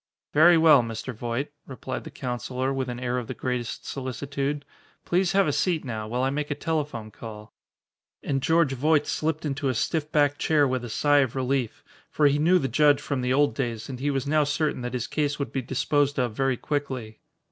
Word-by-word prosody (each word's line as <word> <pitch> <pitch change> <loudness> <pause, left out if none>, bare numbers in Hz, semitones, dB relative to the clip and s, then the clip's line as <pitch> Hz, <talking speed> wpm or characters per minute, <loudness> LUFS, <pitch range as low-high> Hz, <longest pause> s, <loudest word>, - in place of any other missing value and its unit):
"Very 165 +3 +7
well, 155 -4 +7
Mr. 115 +2 -5
Voight," 120 +5 -3 0.2
replied 130 0 -6
the - - -6
counsellor 130 +1 -3
with 130 -1 -2
an 120 0 -5
air 125 0 -1
of 120 - -7
the - - -5
greatest 125 -2 -3
solicitude, 140 +2 -3 0.4
"please 180 +1 +1
have 195 -2 +4
a 145 - +1
seat 160 +1 0
now, 110 -3 -4
while 125 +3 -1
I 135 - +1
make 150 +1 -2
a 145 - -1
telephone 145 -10 -3
call." 105 -2 -10 0.7
And 135 -1 -1
George 160 -1 +3
Voight 150 +3 +2
slipped 155 0 -2
into 140 -1 -1
a 130 - -1
stiff 155 +5 -1
backed 145 -1 +2
chair 150 -3 +3
with 130 -1 -1
a 120 - -6
sigh 145 +5 +3
of 135 -3 0
relief. 130 -2 -1 0.3
For 150 - +1
he 145 +1 +4
knew 175 +5 +5
the 135 - 0
judge 145 +3 +4
from 140 -3 -3
the 125 0 0
old 145 +2 +3
days 115 -4 -3
and 130 -2 -6
he 145 +2 0
was 135 -2 -1
now 150 +1 +3
certain 145 -1 -1
that 125 +1 -4
his 120 -1 -2
case 145 +2 -1
would 140 - -4
be 135 - -1
disposed 145 +3 0
of 125 -4 0
very 135 +1 0
quickly. 130 -7 -4
135 Hz, 210 wpm, -26 LUFS, 125-150 Hz, 0.7 s, Very